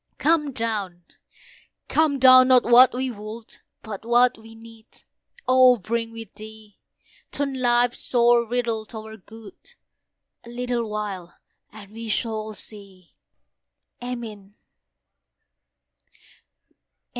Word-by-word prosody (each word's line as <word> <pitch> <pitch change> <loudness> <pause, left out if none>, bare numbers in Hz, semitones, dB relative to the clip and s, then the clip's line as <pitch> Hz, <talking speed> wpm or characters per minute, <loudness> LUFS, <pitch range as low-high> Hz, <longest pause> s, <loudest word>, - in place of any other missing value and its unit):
Come 300 -2 +1
down! 210 -7 -4 0.8
come 310 -3 +1
down! 255 -1 +7
not 255 -2 +5
what 245 +2 +6
we 255 +1 -3
would, 220 +1 -10 0.2
But 215 -2 -8
what 240 +2 +3
we 225 0 -15
need, 225 0 -16 0.6
O 255 -1 +5
bring 230 +2 -3
with 225 -1 -11
Thee. 215 -1 -13 0.5
Turn 280 -1 -3
life's 240 0 +2
sore 240 -1 +3
riddle 230 -1 -2
to 220 - -8
our 220 0 -9
good; 220 +1 -15 0.7
A 235 - -13
little 240 -1 -3
while 200 -5 -6 0.3
and 205 -2 -13
we 225 +1 -8
shall 215 -1 -3
see. 195 -4 -12 0.9
Amen. 220 -5 -8
230 Hz, 110 wpm, -23 LUFS, 215-245 Hz, 0.9 s, down